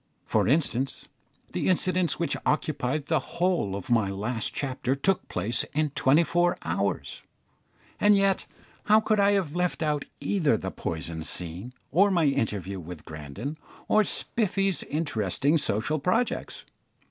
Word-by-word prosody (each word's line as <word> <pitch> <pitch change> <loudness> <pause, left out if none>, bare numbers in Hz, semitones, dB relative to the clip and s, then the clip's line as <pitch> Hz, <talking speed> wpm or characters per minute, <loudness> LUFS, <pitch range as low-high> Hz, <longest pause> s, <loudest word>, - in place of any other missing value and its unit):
For - - +1
instance, 135 -1 0 0.5
the - - 0
incidents 185 -1 +1
which 170 - -1
occupied 150 -1 0
the 160 0 +2
whole 170 - 0
of 100 +3 -6
my 110 -4 +3
last 105 +4 -2
chapter 130 -1 -1
took 185 +7 0
place 115 +2 -1
in 155 -1 +1
twenty 145 +4 +4
four 175 +2 +2
hours, 95 +4 -2 0.8
and 205 0 +5
yet 195 -1 +1 0.4
how 215 +1 +6
could 215 -1 +1
I 200 0 +5
have 180 -6 0
left 180 -2 0
out 150 -2 0
either 155 - +2
the 95 -2 -4
poison 80 -1 -4
scene, 90 +8 -3 0.2
or 195 +7 +5
my 175 -4 +2
interview 100 - -1
with 85 -1 -9
Grandon, 75 - -6 0.3
or 215 - +4
Spiffy's 195 -2 -1
interesting 145 - 0
social 140 +6 -1
projects? 180 - -1
145 Hz, 140 wpm, -27 LUFS, -, 0.8 s, how